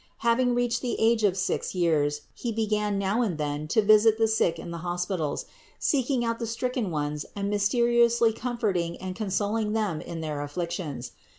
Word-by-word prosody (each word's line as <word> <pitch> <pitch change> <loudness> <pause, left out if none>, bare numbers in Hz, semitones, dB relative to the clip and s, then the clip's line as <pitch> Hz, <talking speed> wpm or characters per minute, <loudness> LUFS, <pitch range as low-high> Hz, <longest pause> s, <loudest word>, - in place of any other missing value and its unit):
Having 245 +1 +3
reached 245 -1 0
the 250 - -2
age 225 0 +3
of 195 -2 +3
six 190 - -1
years 150 -4 +1
He 240 - -4
began 210 -2 0
now 200 +4 +1
and 195 -9 -1
then 150 0 -3
to 215 +7 +2
visit 215 +1 +6
the 225 0 +3
sick 215 -6 +1
in 170 - -7
the 170 - -5
hospitals, 175 -2 -2 0.3
seeking 265 -4 +1
out 230 0 -1
the 230 - -3
stricken 235 -1 -2
ones 150 -2 -2
and 200 0 -2
mysteriously 235 +2 +3
comforting 210 -9 -1
and 185 -1 -6
consoling 210 +1 -1
them 210 -8 -1
in 170 -1 -6
their 150 -2 -3
afflictions. 145 -3 -4
205 Hz, 175 wpm, -27 LUFS, 170-230 Hz, 0.3 s, visit